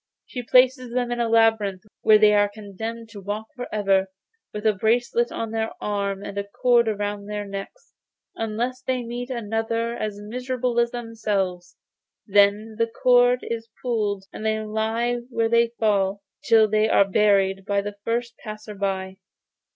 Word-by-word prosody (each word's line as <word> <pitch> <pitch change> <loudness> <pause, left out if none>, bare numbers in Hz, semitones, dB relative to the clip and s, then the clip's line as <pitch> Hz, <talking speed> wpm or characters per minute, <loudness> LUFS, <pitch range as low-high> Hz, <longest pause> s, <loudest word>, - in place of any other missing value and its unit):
She 250 - -6
places 255 +1 +3
them 245 0 -1
in 240 - -2
a 235 -1 +1
labyrinth 220 -4 +3 0.2
where 215 - +7
they 210 0 +5
are 205 0 +4
condemned 220 +2 -7
to 205 -2 -10
walk 210 +3 -5
for 245 -1 -6
ever, 195 -2 +2 0.4
with 210 +1 -6
a 215 - +5
bracelet 235 +3 +1
on 225 -1 -4
their 225 0 -1
arms 200 -1 -2
and 200 - -4
a - - -1
cord 235 +3 +2
round 205 -1 -3
their 210 0 -3
necks, 200 - -8 0.4
unless 235 +4 -3
they 255 -1 -2
meet 240 +2 -5
another 230 0 -2
as 210 -3 -4
miserable 250 +2 -2
as 235 0 +3
themselves. 210 -7 -3 0.5
Then 205 +1 +3
the 230 - +3
cord 245 +1 +4
is 230 -1 -5
pulled 210 -5 -1
and - - -7
they 220 0 +1
lie 220 +3 -1
where 230 -2 0
they 235 0 +4
fall, 200 -2 +1 0.2
till 225 -2 +6
they 215 +1 +2
are 200 - +5
buried 195 -1 +2
by 200 0 0
the 205 +1 -5
first 235 +1 -2
passer 215 0 -7
by. 190 -1 -3
220 Hz, 165 wpm, -24 LUFS, 205-235 Hz, 0.5 s, where